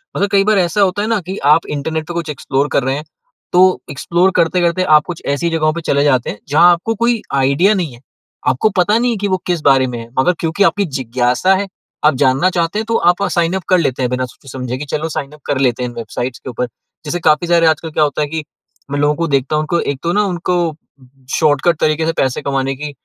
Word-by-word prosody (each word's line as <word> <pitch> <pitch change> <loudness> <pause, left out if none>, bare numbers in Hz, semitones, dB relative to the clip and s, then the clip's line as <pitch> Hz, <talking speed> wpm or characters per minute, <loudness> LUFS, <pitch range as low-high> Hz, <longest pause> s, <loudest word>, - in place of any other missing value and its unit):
मतलब 200 - 0
कई 195 0 +3
बार 215 0 +2
ऐसा 185 +2 +1
होता 195 +1 +2
है 210 - -1
ना 225 -2 +1
कि 185 +3 -6
आप 150 +3 +4
इंटरनेट 155 +2 -3
पे 175 - -5
कुछ 170 -2 -4
एक्सप्लोर 140 -1 -1
कर 140 - +1
रहे 130 +1 0
हैं, 150 - -5 0.5
तो 185 +1 +4
एक्सप्लोर 175 +7 +1
करते-करते 170 +1 +2
आप 150 - +5
कुछ 175 -2 -7
ऐसी 170 +4 -1
जगहों 155 -1 +1
पे 170 - -5
चले 140 -2 +1
जाते 130 -4 +2
हैं 105 - -6
जहाँ 170 +4 +6
आपको 175 +7 -1
कोई 235 -1 +2
आइडिया 140 +9 +3
नहीं 175 -10 -2
है, 120 - -15 0.5
आपको 130 +12 +2
पता 205 +5 +3
नहीं 245 +1 +1
है 225 - -2
कि 205 +1 -2
वो 185 -1 +1
किस 175 -3 0
बारे 135 -2 +4
में 120 - -5
है, 115 - -9
मगर 180 +7 +3
क्योंकि 165 +4 0
आपकी 200 +1 +2
जिज्ञासा 125 +7 +1
है, 200 +1 -2 0.4
आप 150 - +5
जानना 135 +7 +3
चाहते 175 +3 -1
हैं, 220 - -3
तो 230 +1 -1
आप 175 +3 +2
साइन 170 +1 +2
अप 190 - -7
कर 185 - +5
लेते 135 -5 -1
हैं 125 - 0
बिना 125 0 -1
सोचे-समझे 125 0 -7
कि 150 - -6
चलो 155 +2 -3
साइन 150 -2 -4
अप 150 - -16
कर 145 - -1
लेते 125 +1 -2
हैं 125 - -2
इन 120 - -12
वेबसाइट्स 120 +2 -5
के - - -8
ऊपर। 125 +1 -3 0.4
जैसे 175 +4 -2
काफ़ी 155 +3 +2
सारे 170 -1 +3
आजकल 160 +1 0
क्या 155 - +2
होता 150 0 -1
है 150 - 0
कि 155 +1 -4 0.5
मैं 145 - -1
लोगों 145 +1 +2
को 170 +2 -1
देखता 140 0 0
हूँ, 155 - +1
उनको 170 +2 0
एक 140 -1 -3
तो 170 +1 0
ना 210 - +2
उनको 175 -3 -1 0.6
शॉर्टकट 155 +1 +2
तरीके 155 +1 +1
से 165 - 0
पैसे 130 -2 0
कमाने 135 -1 -1
की 150 +2 -6
160 Hz, 250 wpm, -16 LUFS, 135-180 Hz, 0.6 s, जहाँ